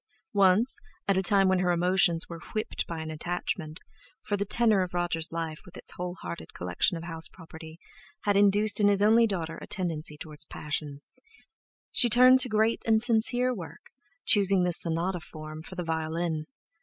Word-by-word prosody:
Once, 200 Hz, +4 st, +4 dB, 0.3 s
at 195 Hz, -, +2 dB
a 190 Hz, -, +2 dB
time 195 Hz, +1 st, +4 dB
when 190 Hz, -1 st, +2 dB
her 180 Hz, 0 st, 0 dB
emotions 175 Hz, -1 st, +1 dB
were 170 Hz, -1 st, -8 dB, 0.2 s
whipped 215 Hz, -, -3 dB
by 165 Hz, -1 st, -5 dB
an 160 Hz, 0 st, -6 dB
attachment—for 170 Hz, +3 st, -6 dB
the 200 Hz, 0 st, -2 dB
tenor 220 Hz, -3 st, +3 dB
of 180 Hz, -1 st, -4 dB
Roger's 170 Hz, -2 st, -1 dB
life, 165 Hz, -2 st, -4 dB
with 180 Hz, -, -14 dB
its -, -, -6 dB
whole 180 Hz, 0 st, -6 dB
hearted 85 Hz, -2 st, -8 dB
collection 90 Hz, -, 0 dB
of 165 Hz, -, -8 dB
house 165 Hz, -1 st, -5 dB
property, 160 Hz, -2 st, -13 dB, 0.4 s
had 205 Hz, -1 st, +1 dB
induced 205 Hz, +2 st, +4 dB
in 205 Hz, -, +4 dB
his 200 Hz, 0 st, +3 dB
only 225 Hz, +2 st, +5 dB
daughter 170 Hz, -6 st, -4 dB
a -, -, -9 dB
tendency 160 Hz, -5 st, -3 dB
towards 155 Hz, +1 st, -8 dB
passion—she 155 Hz, -, -5 dB
turned 255 Hz, +3 st, +7 dB
to 255 Hz, -, +1 dB
great 220 Hz, +1 st, +1 dB
and 220 Hz, 0 st, +2 dB
sincere 245 Hz, +2 st, +2 dB
work, 180 Hz, -8 st, -10 dB, 0.3 s
choosing 195 Hz, -3 st, +4 dB
the 180 Hz, -, +1 dB
sonata 170 Hz, +2 st, +1 dB
form, 155 Hz, 0 st, -9 dB
for 185 Hz, -, -10 dB
the 180 Hz, -, -4 dB
violin. 160 Hz, 0 st, -3 dB
180 Hz, 170 wpm, -27 LUFS, 160-205 Hz, 0.4 s, turned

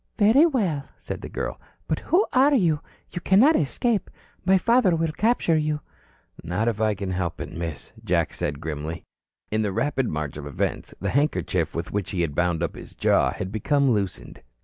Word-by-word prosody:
"Very 235 Hz, +10 st, +6 dB
well," 180 Hz, -, -1 dB
said -, -, -6 dB
the -, -, -7 dB
girl. -, -, -4 dB, 0.3 s
"But -, -, 0 dB
who 385 Hz, +6 st, +2 dB
are 275 Hz, +3 st, +5 dB
you? 165 Hz, -, +3 dB, 0.3 s
You 175 Hz, -, -5 dB
cannot 240 Hz, -, +5 dB
escape. 210 Hz, -, 0 dB, 0.3 s
My 190 Hz, +1 st, +5 dB
father 230 Hz, -3 st, +3 dB
will 165 Hz, -1 st, 0 dB
capture 210 Hz, -2 st, +2 dB
you." 150 Hz, -1 st, 0 dB, 0.6 s
"Not 100 Hz, +7 st, -1 dB
if 110 Hz, -2 st, 0 dB
I 110 Hz, -1 st, +2 dB
can 95 Hz, -1 st, -4 dB
help 90 Hz, -2 st, -2 dB
it, -, -, -5 dB
Miss," 85 Hz, -4 st, -6 dB, 0.4 s
said 75 Hz, -, -2 dB
Jack -, -, -15 dB
grimly. 80 Hz, +1 st, -5 dB, 0.5 s
In 110 Hz, +1 st, +1 dB
the 105 Hz, -2 st, 0 dB
rapid 130 Hz, +4 st, 0 dB
march 75 Hz, -2 st, -3 dB
of 75 Hz, -1 st, -6 dB
events, 75 Hz, -, -3 dB
the 95 Hz, +1 st, -2 dB
handkerchief 140 Hz, -, 0 dB
with 85 Hz, +1 st, -4 dB
which 100 Hz, -2 st, -2 dB
he 90 Hz, -, -1 dB
had 80 Hz, -4 st, -1 dB
bound 85 Hz, 0 st, +1 dB
up 85 Hz, -, -2 dB
his -, -, -11 dB
jaw -, -, +3 dB
had 95 Hz, -, -5 dB
become 140 Hz, +5 st, +2 dB
loosened. 100 Hz, -4 st, -3 dB
115 Hz, 190 wpm, -25 LUFS, -, 0.6 s, Very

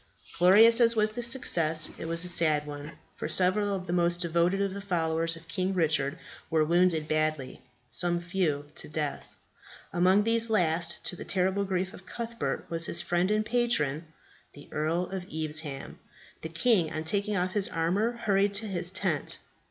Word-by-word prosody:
Glorious 220 Hz, +7 st, +7 dB
as 230 Hz, 0 st, +4 dB
was 215 Hz, -1 st, +3 dB
the 240 Hz, -, -5 dB
success, 165 Hz, -10 st, +1 dB
it -, -, -5 dB
was 165 Hz, +1 st, +2 dB
a -, -, +3 dB
sad 155 Hz, -4 st, +2 dB
one, 145 Hz, +1 st, -8 dB, 0.2 s
for -, -, -5 dB
several 200 Hz, +3 st, +2 dB
of 185 Hz, -1 st, -5 dB
the 175 Hz, -, -3 dB
most 175 Hz, 0 st, +1 dB
devoted 170 Hz, +2 st, +1 dB
of 200 Hz, -1 st, -1 dB
the 200 Hz, -, -6 dB
followers 165 Hz, -3 st, -1 dB
of 165 Hz, 0 st, -14 dB
King 185 Hz, +3 st, -1 dB
Richard 150 Hz, -4 st, +1 dB, 0.3 s
were 160 Hz, -1 st, +2 dB
wounded 170 Hz, -1 st, +2 dB
badly, 155 Hz, -3 st, -1 dB, 0.3 s
some 175 Hz, +8 st, 0 dB
few 170 Hz, -5 st, -1 dB
to -, -, -3 dB
death. 150 Hz, -2 st, -4 dB, 0.6 s
Among 185 Hz, +4 st, +4 dB
these 230 Hz, +1 st, +2 dB
last, 170 Hz, -4 st, 0 dB
to 180 Hz, -, -1 dB
the -, -, -8 dB
terrible 190 Hz, +1 st, 0 dB
grief 190 Hz, 0 st, -2 dB
of 190 Hz, -3 st, -14 dB
Cuthbert, 235 Hz, 0 st, -4 dB
was 165 Hz, 0 st, -1 dB
his 170 Hz, -, 0 dB
friend 175 Hz, +2 st, 0 dB
and 215 Hz, 0 st, +1 dB
patron, 175 Hz, -, 0 dB, 0.5 s
the 145 Hz, -, -14 dB
Earl 160 Hz, +4 st, 0 dB
of 185 Hz, -1 st, -6 dB
Evesham. 155 Hz, -3 st, -4 dB, 0.4 s
The 160 Hz, -, -6 dB
king, 170 Hz, 0 st, +2 dB
on 155 Hz, -1 st, -4 dB
taking 200 Hz, +5 st, 0 dB
off 180 Hz, +1 st, 0 dB
his 205 Hz, -2 st, +2 dB
armour, 185 Hz, +8 st, 0 dB
hurried 200 Hz, -3 st, +1 dB
to 215 Hz, +2 st, +1 dB
his 175 Hz, -3 st, -1 dB
tent. 185 Hz, -6 st, -1 dB
175 Hz, 175 wpm, -28 LUFS, 160-200 Hz, 0.6 s, Glorious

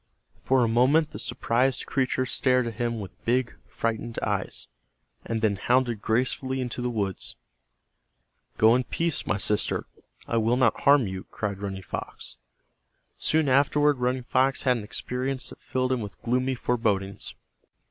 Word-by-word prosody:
For 130 Hz, -1 st, +3 dB
a -, -, +3 dB
moment 130 Hz, +7 st, +3 dB
the -, -, -7 dB
surprised 125 Hz, +3 st, 0 dB
creature 130 Hz, -1 st, 0 dB
stared 125 Hz, -1 st, +2 dB
at 115 Hz, -, -3 dB
him 115 Hz, +1 st, -2 dB
with 100 Hz, -3 st, -9 dB
big 120 Hz, 0 st, +1 dB
frightened 115 Hz, 0 st, -3 dB
eyes, -, -, -2 dB, 0.6 s
and 115 Hz, -1 st, -3 dB
then 100 Hz, -2 st, +2 dB
hounded 120 Hz, 0 st, +1 dB
gracefully 130 Hz, +4 st, 0 dB
into 125 Hz, -1 st, -3 dB
the 125 Hz, -, 0 dB
woods. 100 Hz, -5 st, -3 dB, 1.2 s
"Go 110 Hz, +1 st, +6 dB
in 125 Hz, +1 st, +2 dB
peace, 165 Hz, +4 st, -2 dB
my 105 Hz, -, +1 dB
sister, 105 Hz, +1 st, -1 dB, 0.4 s
I 115 Hz, -, 0 dB
will 115 Hz, +2 st, +2 dB
not 125 Hz, -4 st, +3 dB
harm 140 Hz, -3 st, +5 dB
you," 95 Hz, -1 st, -5 dB
cried 100 Hz, -2 st, -3 dB
Running 95 Hz, -1 st, -5 dB
Fox. -, -, -7 dB, 0.8 s
Soon 155 Hz, -1 st, +2 dB
afterward 145 Hz, +1 st, +3 dB
Running 125 Hz, +1 st, 0 dB
Fox 130 Hz, +2 st, +1 dB
had 125 Hz, -1 st, +3 dB
an 110 Hz, -, -5 dB
experience 125 Hz, +4 st, -3 dB
that -, -, -13 dB
filled 130 Hz, 0 st, -1 dB
him 130 Hz, -2 st, +1 dB
with 105 Hz, -2 st, -8 dB
gloomy 130 Hz, +2 st, +1 dB
forebodings. 105 Hz, -6 st, -1 dB
125 Hz, 155 wpm, -26 LUFS, 110-130 Hz, 1.2 s, Go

